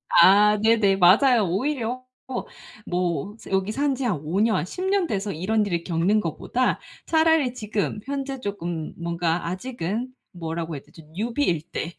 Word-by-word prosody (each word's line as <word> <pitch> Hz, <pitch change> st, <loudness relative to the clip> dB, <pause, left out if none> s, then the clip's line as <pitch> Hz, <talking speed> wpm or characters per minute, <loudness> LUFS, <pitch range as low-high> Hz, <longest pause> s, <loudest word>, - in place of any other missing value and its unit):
아. 205 Hz, +4 st, +7 dB
네네. 220 Hz, -3 st, +4 dB
맞아요. 215 Hz, +5 st, +5 dB
오히려 250 Hz, -, -2 dB, 0.2 s
또 260 Hz, -, -4 dB, 0.4 s
뭐 180 Hz, +2 st, -2 dB
산 -, -, -9 dB
여기 190 Hz, +2 st, +1 dB
산 280 Hz, +3 st, 0 dB
지 270 Hz, -, -4 dB
한 200 Hz, -10 st, 0 dB
5 170 Hz, +6 st, -1 dB
년, 220 Hz, -5 st, +2 dB
10 365 Hz, -, -6 dB
년 385 Hz, -2 st, +2 dB
돼서 205 Hz, -5 st, -2 dB
이런 205 Hz, +6 st, 0 dB
일을 170 Hz, -4 st, -2 dB
겪는 180 Hz, +5 st, +2 dB
거보다 210 Hz, +8 st, -1 dB, 0.3 s
차라리 320 Hz, -5 st, +3 dB
지금 210 Hz, -3 st, -2 dB
현재 275 Hz, -1 st, -4 dB
쪼끔 175 Hz, -7 st, -4 dB
뭔가 170 Hz, 0 st, -1 dB
아직은 225 Hz, +3 st, -3 dB, 0.2 s
뭐라고 165 Hz, -1 st, -4 dB
해야 140 Hz, -, -7 dB
되지? 165 Hz, -, -16 dB, 0.2 s
newbie일 225 Hz, -, 0 dB
때 170 Hz, -, -4 dB
205 Hz, 295 characters per minute, -24 LUFS, 175-250 Hz, 0.4 s, 아